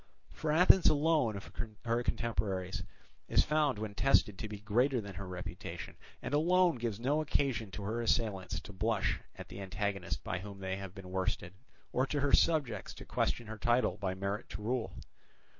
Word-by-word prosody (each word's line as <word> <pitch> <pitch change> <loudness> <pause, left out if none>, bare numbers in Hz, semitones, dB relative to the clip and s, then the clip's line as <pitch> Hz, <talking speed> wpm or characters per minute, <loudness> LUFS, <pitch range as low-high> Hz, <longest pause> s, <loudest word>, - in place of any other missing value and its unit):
For 155 - -2
Athens 180 +3 +7
alone 150 -8 +2
of 100 - -9 0.3
her 115 +1 +2
contemporaries 100 -6 -1 0.5
is - - +4
found 150 -5 +2
when 105 -1 -4
tested 105 -5 +3
to - - -3
be 105 -1 -6
greater 120 +5 +2
than 100 -3 -6
her 95 +1 -6
reputation, 90 -1 -6 0.3
and - - -4
alone 175 +1 +4
gives 115 -3 -2
no 140 +6 +2
occasion 135 -7 0
to 105 +1 -6
her 110 +4 -1
assailants 105 -4 0
to 100 - -10
blush 110 +2 +1 0.2
at - - -9
the 100 - -7
antagonist 100 -1 -2
by 90 - -2
whom 100 +1 -8
they 95 0 -2
have 95 -1 -7
been 95 -2 -9
worsted, 95 -1 -1 0.4
or 130 +2 +2
to 145 - -1
her 140 -1 +1
subjects 135 - +2
to - - -10
question 120 - 0
her 110 0 -7
title 120 -4 +2
by 95 -3 -2
merit 100 +4 -3
to 105 - -6
rule. 120 +1 -1
110 Hz, 180 wpm, -33 LUFS, 100-135 Hz, 0.5 s, Athens